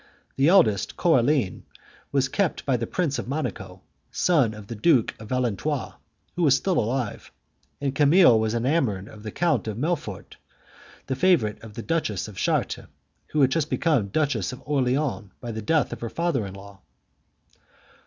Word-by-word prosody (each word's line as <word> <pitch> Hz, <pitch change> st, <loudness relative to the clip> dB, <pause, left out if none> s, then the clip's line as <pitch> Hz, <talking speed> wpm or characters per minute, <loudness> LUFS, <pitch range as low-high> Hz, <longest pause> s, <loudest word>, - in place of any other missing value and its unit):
The 135 Hz, +2 st, +3 dB
eldest, 160 Hz, -, +3 dB
Coraline, 135 Hz, -, +2 dB, 0.5 s
was 135 Hz, -1 st, +2 dB
kept 185 Hz, +5 st, -1 dB
by 135 Hz, -, +2 dB
the 115 Hz, -1 st, -2 dB
Prince 165 Hz, -6 st, -1 dB
of -, -, -5 dB
Monaco, 135 Hz, -5 st, -4 dB, 0.3 s
son 140 Hz, -11 st, +2 dB
of 105 Hz, -1 st, -10 dB
the 115 Hz, -, -7 dB
Duke 120 Hz, +1 st, +3 dB
of 110 Hz, -, -9 dB
Valentinois, 125 Hz, -6 st, -1 dB, 0.4 s
who 180 Hz, -, -2 dB
was 145 Hz, -5 st, +5 dB
still 185 Hz, +5 st, 0 dB
alive; 120 Hz, 0 st, -3 dB, 0.5 s
and 140 Hz, -2 st, -1 dB
Camille 145 Hz, -4 st, +6 dB
was 110 Hz, +1 st, 0 dB
enamoured 120 Hz, -, 0 dB
of 105 Hz, -, -12 dB
the 110 Hz, -, -6 dB
Count 170 Hz, -1 st, 0 dB
of 110 Hz, -1 st, -4 dB
Melfort, 160 Hz, +5 st, -3 dB, 0.7 s
the 130 Hz, -, -2 dB
favourite 135 Hz, -, +2 dB
of 110 Hz, -2 st, -12 dB
the 115 Hz, -, -6 dB
Duchess 155 Hz, -, -1 dB
of 105 Hz, -, -11 dB
Chartres, -, -, -1 dB, 0.4 s
who 155 Hz, -, 0 dB
had 135 Hz, -1 st, +4 dB
just 155 Hz, +1 st, 0 dB
become 145 Hz, -, +1 dB
Duchess 125 Hz, -, 0 dB
of 125 Hz, -, -10 dB
Orleans 135 Hz, -5 st, 0 dB
by 120 Hz, -, -6 dB
the 110 Hz, 0 st, -5 dB
death 155 Hz, +8 st, +1 dB
of -, -, -9 dB
her 115 Hz, -, -3 dB
father 155 Hz, -10 st, -1 dB
in 95 Hz, -, -9 dB
law. 100 Hz, 0 st, -13 dB
130 Hz, 170 wpm, -25 LUFS, 110-155 Hz, 0.7 s, Camille